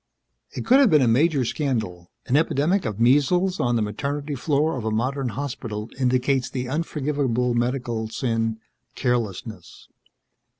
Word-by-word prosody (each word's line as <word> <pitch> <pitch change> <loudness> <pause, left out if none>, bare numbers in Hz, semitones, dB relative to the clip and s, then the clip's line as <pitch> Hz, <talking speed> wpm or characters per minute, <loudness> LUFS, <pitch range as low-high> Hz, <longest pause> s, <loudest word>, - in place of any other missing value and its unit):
It - - -5
could 255 +4 +6
have 275 -5 +6
been 150 -5 +5
a - - +3
major 135 +3 +3
scandal. 110 - -3 0.2
An 130 - 0
epidemic 160 +4 +2
of 110 -2 -3
measles 150 +10 +3
on 120 0 +1
the 115 - +1
maternity 145 +7 -3
floor 145 +3 0
of 125 - -4
a 110 - -1
modern 130 +4 -1
hospital 115 -3 -5
indicates 130 0 +1
the 125 -1 -4
unforgivable 140 -4 -1
medical 120 -2 -1
sin 115 -1 -1 0.4
carelessness. 110 -6 -3
130 Hz, 140 wpm, -23 LUFS, 115-145 Hz, 0.4 s, could